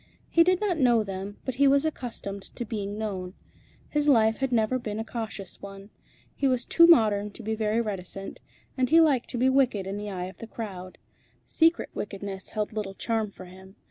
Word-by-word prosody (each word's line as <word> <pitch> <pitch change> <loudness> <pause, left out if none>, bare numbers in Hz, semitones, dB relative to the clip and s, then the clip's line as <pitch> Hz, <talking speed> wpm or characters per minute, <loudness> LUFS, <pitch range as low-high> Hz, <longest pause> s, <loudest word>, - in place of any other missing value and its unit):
He 335 - +6
did 365 +1 +3
not 380 -6 0
know 240 -4 +4
them, 195 +1 -6
but 260 - -2
he 280 - +7
was 280 +2 +4
accustomed 230 -9 -4
to 240 - -4
being 205 -2 -4
known. 190 -4 -4 0.5
His 295 0 0
life 225 -5 +4
had 270 -1 -1
never 235 +2 +2
been 215 -3 -5
a 225 - -3
cautious 220 -5 -6
one. 195 +1 -10 0.4
He 275 - +1
was 255 -2 +1
too 335 0 +6
modern 210 -10 +5
to - - -10
be 220 +1 -2
very 220 +1 0
reticent, 195 -2 -5 0.3
and 255 -2 +1
he 330 - +7
liked 285 -7 +3
to 250 - -3
be 250 +2 +3
wicked 260 -7 +2
in 195 +1 -4
the 205 0 -5
eye 180 -2 -4
of 185 - -9
the 230 - -8
crowd. 190 -5 -7 0.5
Secret 330 +1 +2
wickedness 195 -1 -5
held 215 0 -3
little 205 -3 -4
charm 225 -1 -1
for 190 -2 -12
him. 190 +2 -14
220 Hz, 205 wpm, -27 LUFS, 200-255 Hz, 0.5 s, he